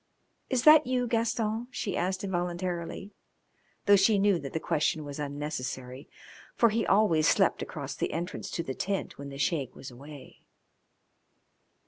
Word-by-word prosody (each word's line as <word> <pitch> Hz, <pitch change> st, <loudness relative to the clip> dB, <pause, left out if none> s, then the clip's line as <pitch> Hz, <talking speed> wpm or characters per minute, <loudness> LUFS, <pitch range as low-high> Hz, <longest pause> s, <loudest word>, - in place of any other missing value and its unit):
"Is 255 Hz, -3 st, +1 dB
that 305 Hz, 0 st, +8 dB
you, 250 Hz, -1 st, +1 dB
Gaston?" 225 Hz, 0 st, -1 dB
she 205 Hz, -6 st, -3 dB
asked 185 Hz, +2 st, -1 dB
involuntarily, 175 Hz, 0 st, -3 dB, 0.7 s
though 205 Hz, -, +7 dB
she 200 Hz, +2 st, +4 dB
knew 200 Hz, -2 st, +3 dB
that 140 Hz, -3 st, -7 dB
the 160 Hz, -, -2 dB
question 155 Hz, 0 st, 0 dB
was 145 Hz, 0 st, -7 dB
unnecessary, 140 Hz, -2 st, -5 dB, 0.5 s
for 235 Hz, -, +4 dB
he 225 Hz, +1 st, -1 dB
always 175 Hz, -7 st, +4 dB
slept -, -, +3 dB
across -, -, -5 dB
the -, -, -2 dB
entrance 170 Hz, +2 st, -4 dB
to 170 Hz, -, -3 dB
the 135 Hz, -, -4 dB
tent 195 Hz, +2 st, -3 dB
when 140 Hz, 0 st, -7 dB
the 135 Hz, -, -8 dB
Sheik 140 Hz, -3 st, -1 dB
was 130 Hz, -, -9 dB
away. 140 Hz, +3 st, -12 dB
175 Hz, 150 wpm, -29 LUFS, 145-210 Hz, 0.7 s, that